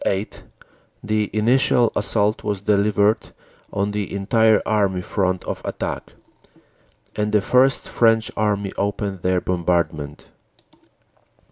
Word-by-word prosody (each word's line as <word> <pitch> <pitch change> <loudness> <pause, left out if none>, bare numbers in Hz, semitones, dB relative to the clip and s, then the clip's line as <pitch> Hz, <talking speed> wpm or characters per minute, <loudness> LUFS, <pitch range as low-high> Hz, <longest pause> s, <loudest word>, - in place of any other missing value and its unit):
8, 100 +2 -2 0.6
the 105 -1 0
initial 120 +2 +3
assault 105 +1 +1
was 100 -2 -2
delivered 105 +1 +1 0.4
on 100 0 -1
the 105 -1 -3
entire 110 +2 +3
Army 100 -4 0
front 95 -2 -1
of - - -5
attack, - - -5 1.0
and 105 0 -1
the 105 - +4
First 130 +4 +3
French 115 -1 +2
Army 100 -2 -1
opened 100 -2 -2
their 90 0 +1
bombardment. 85 -5 -2
105 Hz, 110 wpm, -21 LUFS, 95-110 Hz, 1.0 s, the